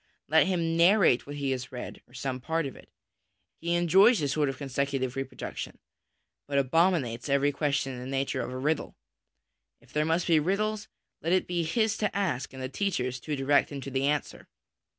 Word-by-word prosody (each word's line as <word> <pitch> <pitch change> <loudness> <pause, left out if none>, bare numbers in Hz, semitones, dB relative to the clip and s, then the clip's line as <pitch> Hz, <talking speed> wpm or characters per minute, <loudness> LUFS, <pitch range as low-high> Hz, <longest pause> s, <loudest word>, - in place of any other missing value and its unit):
Let 160 +5 +4
him 170 -3 0
narrate 170 - +4
what 145 - -6
he 140 -2 -1
has 130 -1 -4
read, 125 -1 -7
or 125 - -19
some 130 0 -3
part 160 +4 -1
of 135 - -6
it. - - -16 0.7
He 170 +1 0
enjoys 190 +7 +5
this 145 -5 -1
sort 145 0 +1
of 135 - -5
con 140 - -6
secutive 135 -1 -1
reproduction, 135 0 -5 0.7
but 140 -1 -1
abominates 140 -4 +2
every 140 +1 +3
question 140 -2 -1
in 125 - -7
the 125 - -7
nature 135 0 -1
of - - -4
a 130 - -5
riddle. 150 +4 -1 0.8
If - - -23
there 150 - +2
must 165 +3 +1
be 165 -3 +4
riddles, 210 +6 -1 0.3
let 165 +2 0
it 185 - +3
be 175 -1 -1
his 220 +7 +1
to 215 - -1
ask 175 -10 -1
and 130 0 -8
the - - -1
teacher's 130 -6 -2
to 150 +4 -3
direct 140 +2 +2
him 140 - -5
to 135 - -7
the 135 +1 +1
answer. 150 0 -2
145 Hz, 200 wpm, -28 LUFS, 135-170 Hz, 0.8 s, enjoys